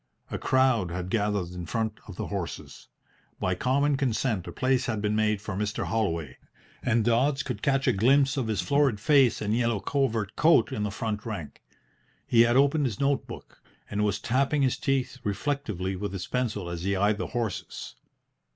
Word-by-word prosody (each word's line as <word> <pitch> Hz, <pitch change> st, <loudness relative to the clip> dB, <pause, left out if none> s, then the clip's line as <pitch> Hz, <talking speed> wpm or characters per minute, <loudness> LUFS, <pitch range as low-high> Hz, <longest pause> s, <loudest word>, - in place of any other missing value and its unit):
A -, -, -3 dB
crowd 130 Hz, -8 st, +2 dB
had 90 Hz, +2 st, -4 dB
gathered 105 Hz, -4 st, 0 dB
in 90 Hz, -2 st, -7 dB
front 110 Hz, 0 st, -2 dB
of 100 Hz, -, -9 dB
the -, -, -4 dB
horses. 100 Hz, -4 st, -6 dB, 0.5 s
By 90 Hz, -, 0 dB
common 140 Hz, +8 st, +1 dB
consent 120 Hz, -6 st, -1 dB
a -, -, -5 dB
place 130 Hz, -1 st, +1 dB
had 110 Hz, -3 st, -1 dB
been 105 Hz, 0 st, 0 dB
made 105 Hz, -1 st, +1 dB
for 105 Hz, -, -4 dB
Mr. 105 Hz, +2 st, -2 dB
Holloway, 85 Hz, -, -2 dB, 0.4 s
and 120 Hz, -3 st, +1 dB
Dodds 130 Hz, +4 st, +2 dB
could -, -, -5 dB
catch 135 Hz, 0 st, +1 dB
a 130 Hz, -, +4 dB
glimpse 135 Hz, +7 st, +3 dB
of 130 Hz, -5 st, -1 dB
his 110 Hz, -3 st, 0 dB
florid 140 Hz, -6 st, +2 dB
face 135 Hz, -1 st, +4 dB
and 105 Hz, +1 st, 0 dB
yellow 115 Hz, -3 st, +1 dB
covert 115 Hz, -5 st, -1 dB
coat 160 Hz, -7 st, +4 dB
in 105 Hz, -, -3 dB
the 105 Hz, -, 0 dB
front 105 Hz, +1 st, -3 dB
rank. 95 Hz, -11 st, -6 dB, 0.6 s
He 115 Hz, -, +5 dB
had 120 Hz, +1 st, +4 dB
opened 140 Hz, +1 st, +3 dB
his 105 Hz, -5 st, -5 dB
note 140 Hz, 0 st, +1 dB
book, -, -, -11 dB, 0.3 s
and 105 Hz, 0 st, 0 dB
was 105 Hz, -1 st, +1 dB
tapping 135 Hz, +6 st, +1 dB
his 130 Hz, -, +1 dB
teeth 135 Hz, -2 st, -1 dB
reflectively 100 Hz, -4 st, -2 dB
with 100 Hz, +1 st, -4 dB
his 95 Hz, -1 st, -4 dB
pencil 110 Hz, -5 st, -2 dB
as 85 Hz, -1 st, -5 dB
he 100 Hz, +2 st, 0 dB
eyed 100 Hz, +2 st, +2 dB
the -, -, -2 dB
horses. 115 Hz, -5 st, -4 dB
110 Hz, 190 wpm, -27 LUFS, 100-130 Hz, 0.6 s, He